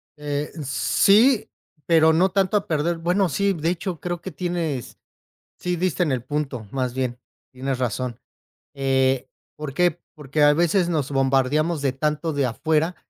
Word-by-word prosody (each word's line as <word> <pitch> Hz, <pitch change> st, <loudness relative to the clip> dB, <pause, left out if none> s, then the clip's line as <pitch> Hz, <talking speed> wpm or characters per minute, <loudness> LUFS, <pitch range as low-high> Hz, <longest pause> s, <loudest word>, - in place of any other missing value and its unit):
Eh, 145 Hz, 0 st, -3 dB
sí 205 Hz, -, +3 dB, 0.4 s
pero, 160 Hz, -1 st, +5 dB
no 180 Hz, +4 st, +3 dB
tanto 195 Hz, +1 st, +2 dB
a 200 Hz, -, -3 dB
perder. 165 Hz, +2 st, 0 dB
Bueno, 175 Hz, +3 st, +1 dB
sí, 200 Hz, +6 st, +1 dB
de 165 Hz, -1 st, -1 dB
hecho, 175 Hz, -1 st, -3 dB
creo 175 Hz, -1 st, -3 dB
que 190 Hz, -, -6 dB
tienes 165 Hz, -7 st, -3 dB, 0.6 s
si 180 Hz, 0 st, -1 dB
diste 180 Hz, 0 st, 0 dB
en 150 Hz, -, 0 dB
el 125 Hz, -2 st, -1 dB
punto, 135 Hz, -6 st, -3 dB
más 130 Hz, -2 st, -2 dB
bien 125 Hz, -2 st, -2 dB, 0.3 s
tienes 130 Hz, 0 st, -3 dB
razón, 125 Hz, 0 st, -2 dB, 0.5 s
eh, 135 Hz, -1 st, +1 dB, 0.3 s
¿por 150 Hz, -3 st, -6 dB
qué? 175 Hz, 0 st, +1 dB
Porque, 150 Hz, 0 st, -3 dB
a 145 Hz, 0 st, +6 dB
veces, 175 Hz, +2 st, +2 dB
nos 145 Hz, -4 st, -1 dB
bombardeamos 135 Hz, +4 st, +1 dB
de 135 Hz, -2 st, 0 dB
tanto 150 Hz, +3 st, -1 dB
de 140 Hz, -2 st, +1 dB
afuera 155 Hz, +7 st, 0 dB
150 Hz, 160 wpm, -23 LUFS, 135-175 Hz, 0.6 s, a